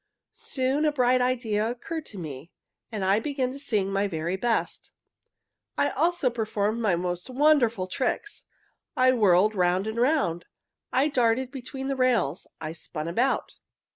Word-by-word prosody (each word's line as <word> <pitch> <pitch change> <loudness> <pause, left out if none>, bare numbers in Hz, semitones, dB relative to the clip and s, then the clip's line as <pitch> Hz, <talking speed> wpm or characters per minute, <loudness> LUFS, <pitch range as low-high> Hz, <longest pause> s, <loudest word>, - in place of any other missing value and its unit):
Soon 265 +3 -1
a 305 - +3
bright 255 -2 +3
idea 230 -4 0
occurred 310 +6 -5
to 205 - -10
me. 150 -3 -7 0.4
I 200 -1 +1
began 265 0 -2
to 275 - -8
sing 200 -7 -1
my 200 +1 +1
very 170 0 -2
best. 230 +4 -2 0.8
I - - +2
also 335 -7 +1
performed 220 -1 -1
my 205 -6 +2
most 175 +3 -3
wonderful 255 -7 +3
tricks. 260 - -3 0.5
I 255 0 +5
whirled 210 -3 +4
round 180 0 +1
and 220 +1 -3
round. 245 - +1 0.5
I 265 +3 +3
darted 250 -2 +1
between 265 0 -6
the 275 0 -1
rails. 240 - +1
I 160 0 -5
spun 155 -1 -6
about. 235 +11 0
230 Hz, 145 wpm, -26 LUFS, 190-260 Hz, 0.8 s, I